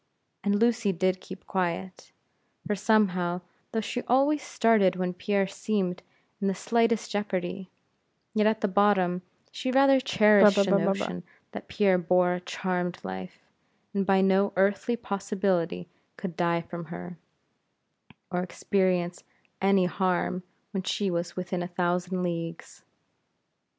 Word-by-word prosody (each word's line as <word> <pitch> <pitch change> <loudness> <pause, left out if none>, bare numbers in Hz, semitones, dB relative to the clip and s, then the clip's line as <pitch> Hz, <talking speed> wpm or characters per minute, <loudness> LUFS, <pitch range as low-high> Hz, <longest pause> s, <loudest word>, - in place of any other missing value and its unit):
And 205 0 +2
Lucy 230 -3 +2
did 185 +1 0
keep 190 +1 -11
quiet; 185 0 -3 0.5
for 210 - 0
somehow, 185 -4 +1 0.3
though 225 - -1
she 245 +3 -3
always 280 +4 +3
started 220 -7 +3
when 180 0 -2
Pierre 200 +1 0
seemed 190 -2 -2 0.4
in 195 - +1
the 195 - 0
slightest 230 +2 +1
jeopardy, 190 -2 -3 0.6
yet 215 -1 +3
at 215 -2 0
bottom 190 -3 +3 0.3
she 260 - -4
rather 270 +1 +5
cherished 210 -5 +5
a 195 -1 +3
notion 195 - +1 0.3
that - - -8
Pierre 195 -3 +2
bore 180 0 +3
a 180 - -3
charmed 180 0 -3
life, 95 0 -7 0.5
and 200 -1 +1
by 190 0 +3
no 195 +1 +3
earthly 200 +5 +1
possibility 195 -5 -2 0.3
could 190 -5 -6
die 170 -1 +1
from 170 0 -8
her, 175 +1 -9 1.1
or 180 - 0
experience 180 -1 -1 0.4
any 195 -1 +4
harm, 185 0 0 0.3
when 195 -2 -2
she 195 +1 -1
was 175 0 -3
within 180 0 -3
a 175 - -3
thousand 180 +1 -1
leagues. 165 -1 -5
190 Hz, 130 wpm, -27 LUFS, 180-205 Hz, 1.1 s, rather